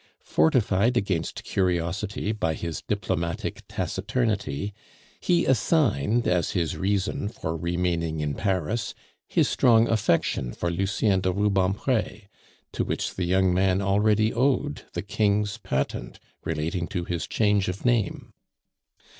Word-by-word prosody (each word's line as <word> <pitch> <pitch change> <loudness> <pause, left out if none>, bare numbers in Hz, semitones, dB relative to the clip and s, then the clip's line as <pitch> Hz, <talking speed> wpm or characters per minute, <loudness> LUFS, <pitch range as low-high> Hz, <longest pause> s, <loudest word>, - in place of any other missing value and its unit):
Fortified 105 +7 +2
against 95 -7 -1
curiosity 95 +3 -1
by 80 -7 -1
his 85 -1 -4
diplomatic 85 -5 -2
taciturnity, 105 - -2 0.5
he 175 -1 +2
assigned 120 - +2
as 90 -2 +1
his 85 -4 0
reason 100 +1 -1
for 80 -7 -4
remaining 85 -1 -1
in 75 -1 -1
Paris 100 +5 -1 0.3
his - - +2
strong 115 -2 +4
affection 85 - +1
for 85 - -2
Lucien 95 +2 +1
de 95 - +1
Rubempre, 100 +4 0 0.5
to - - -1
which - - -2
the 90 - -2
young 95 +1 +3
man 95 0 +2
already 105 +2 +2
owed 125 - 0
the - - -3
King's 105 0 0
patent 70 -9 -3 0.2
relating 80 +3 -2
to 90 -3 -3
his 85 -2 -3
change 105 -3 +2
of 90 +5 -4
name. 120 -5 0
95 Hz, 120 wpm, -26 LUFS, 85-105 Hz, 0.5 s, strong